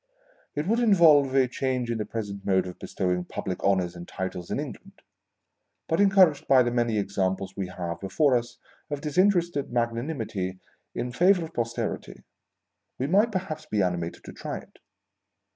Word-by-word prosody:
It 150 - -1
would 225 +5 +2
involve 160 - +5
a 130 -2 +5
change 125 -1 -2
in 115 - -2
the 105 - -3
present 100 -3 -5
mode 95 -2 +2
of 90 -1 -8
bestowing 90 -2 -1
public 90 +1 -5
honours 95 -3 +1
and 85 0 -9
titles 90 -2 -5
in - - -1
England; - - -8 0.8
but, 165 +4 +2
encouraged 190 -7 +5
by 130 -2 +6
the 120 - -1
many 120 -2 +1
examples 95 -1 -1
we 95 -2 -3
have 85 -2 -5
before 125 - +2
us 120 0 -2 0.3
of 145 -1 -3
disinterested 175 -1 +1
magnanimity 115 -6 -2 0.4
in 125 - -3
favour 180 +5 +4
of 160 - -12
Posterity, 115 0 -3 0.7
we 130 - -1
might 205 +9 +3
perhaps 185 -5 -4
be 105 -2 +1
animated 85 -2 -2
to - - -10
try - - -5
it. - - -14
120 Hz, 160 wpm, -26 LUFS, 95-155 Hz, 0.8 s, by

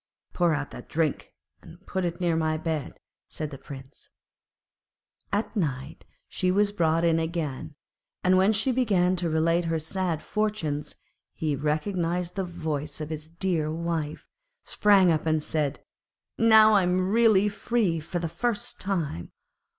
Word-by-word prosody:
'Pour 175 -3 +2
out 145 -1 -4
the - - -8
drink, 155 -3 -2 0.3
and 175 +2 -15
put 190 -1 -2
it 170 0 -3
near 175 -2 +1
my 155 -1 0
bed,' 155 -3 -4 0.3
said 155 -1 -5
the 135 - -7
Prince. 135 0 -11 1.2
At 210 +3 -1
night 140 -7 -3 0.2
she 185 - -1
was 205 +2 +3
brought 165 -4 +1
in 165 -1 +3
again, 160 -3 -3 0.5
and 185 +1 +4
when 190 +3 +4
she 220 +5 +2
began 195 -8 +2
to 175 -1 -1
relate 165 +2 +2
her 165 0 0
sad 165 0 -2
fortunes 205 -9 -2 0.4
he 155 -3 -1
recognised 170 +4 -1
the 195 - -1
voice 155 -4 -4
of 155 0 -5
his 155 0 -6
dear 165 -3 -1
wife, 160 -2 -3 0.4
sprang 195 -4 +4
up, 160 0 0
and 155 -1 +1
said, 150 -4 -2 0.5
'Now 220 -1 +6
I 200 - +5
am 185 +1 +1
really 220 -3 +5
free 205 -4 0
for 160 +3 -4
the 170 -1 -2
first 235 +6 -3
time. 165 - -2
170 Hz, 150 wpm, -26 LUFS, 155-190 Hz, 1.2 s, Now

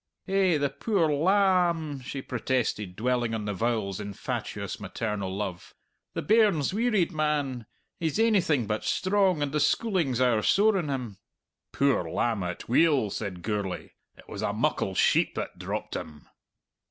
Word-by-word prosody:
"Eh, 190 -4 +3
the 140 -1 0
puir 175 -1 +1
la 185 +3 +4
amb," 155 -5 -5
she 135 +1 -6
protested, 120 -6 -2
dwelling 120 +1 0
on 105 -2 -4
the 105 - -2
vowels 110 -2 -1
in 100 -1 -5
fatuous, - - -4
maternal 105 -4 -3
love; 95 -3 -5 0.4
"the - - -2
bairn's 205 -9 +3
wearied, 215 -5 +1
man! 145 - -1 0.3
He's 160 -1 -1
ainything 185 - +3
but 105 +1 -2
strong, 185 -5 +2
and 140 - -2
the 150 - 0
schooling's 170 - +1
owre 120 -4 +3
sore 205 - +4
on 155 -5 -3
him." 120 -8 -4 0.5
"Poor 140 -1 +1
lamb, 115 -4 0
atweel," 115 - +1
said 95 -5 -5
Gourlay. 105 -4 -3 0.3
"It - - -17
was - - -6
a - - 0
muckle - - 0
sheep - - +3
that - - -5
dropped - - -4
him." 75 -2 -7
135 Hz, 155 wpm, -27 LUFS, 110-175 Hz, 0.5 s, la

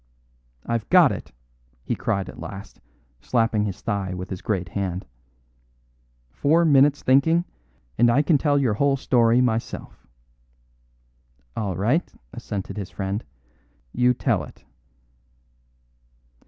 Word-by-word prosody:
"I've 115 -2 -2
got 180 -6 +6
it," - - -7 0.5
he - - -2
cried 95 -2 -2
at - - -10
last, 100 -2 -9 0.4
slapping 115 - +1
his 100 -3 -5
thigh 100 -4 -2
with 90 +2 -7
his 95 - -5
great 95 -5 -2
hand. 95 -1 -3 1.3
"Four 165 - +2
minutes' 145 -1 +4
thinking, 160 +6 +3 0.5
and 120 0 +6
I 135 +5 +3
can 150 -2 +3
tell 145 -1 +2
your 130 -6 +2
whole 140 +5 +2
story 120 -2 +3
myself." 115 - -3 1.5
"All 100 -5 -2
right," 125 - +1 0.2
assented 100 +1 -6
his 100 -3 -5
friend. 100 +2 -4 0.7
"You 125 0 +3
tell - - 0
it." - - -14
115 Hz, 120 wpm, -23 LUFS, 100-140 Hz, 1.5 s, got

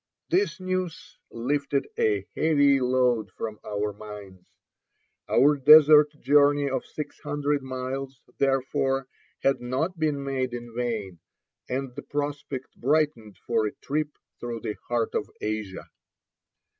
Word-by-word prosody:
This 380 - +1
news 185 -2 -4
lifted 140 +3 -1
a 105 -3 +1
heavy 145 -3 +4
load 125 -4 +2
from 110 -2 -5
our 105 0 -2
minds; 100 -3 -11 0.8
our 145 +2 +5
desert 150 +1 +8
journey 145 0 +4
of 135 - -1
six 150 -2 -7
hundred 145 0 -1
miles, 130 +1 -5 0.2
therefore, 135 0 +1 0.4
had 135 - +2
not 140 +9 -2
been 150 -3 0
made 130 -2 -2
in 120 -1 -8
vain, 110 -8 -3 0.5
and 130 0 -3
the - - -6
prospect 145 -2 -4
brightened 135 -6 0
for 115 -2 +1
a - - -7
trip 150 +1 -3 0.2
through 120 -1 -5
the 105 - -3
heart 120 -2 0
of - - -2
Asia. 105 -3 -4
135 Hz, 125 wpm, -26 LUFS, 115-145 Hz, 0.8 s, desert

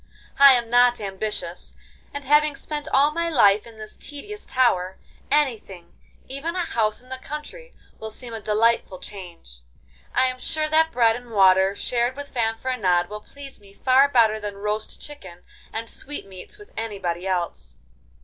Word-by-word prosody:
I 280 -1 +10
am 240 -2 +1
not 245 +1 +4
ambitious, 195 -3 -5 0.4
and 285 - -6
having 295 +1 +4
spent 295 +1 -6
all 285 +2 +4
my 335 +2 -1
life 210 -8 +4
in 225 -1 -14
this 215 0 -9
tedious 415 +9 -9
tower, 190 -8 +1 0.3
anything—even 265 - -3
a 365 - 0
house 220 -5 0
in 255 - -20
the 260 0 -6
country—will 300 - -9
seem 235 +2 -8
a 225 - -6
delightful 215 -2 +1
change. 175 - -10 0.5
I 260 - +4
am 255 0 -2
sure 310 +3 -1
that 320 +1 +3
bread 230 -4 +3
and 245 0 -10
water 190 -2 +4
shared 245 +3 -1
with 285 0 -8
Fanfaronade 225 -6 0
will 210 0 -7
please 280 +3 -11
me 200 -1 -18
far 265 +6 +4
better 225 -5 +3
than 205 -1 -6
roast 210 +1 -4
chicken 185 -13 -11 0.3
and 225 +1 -5
sweetmeats 215 - -7
with 415 0 -15
anybody 195 -5 -3
else. 180 -2 -3
230 Hz, 155 wpm, -23 LUFS, 200-280 Hz, 0.5 s, I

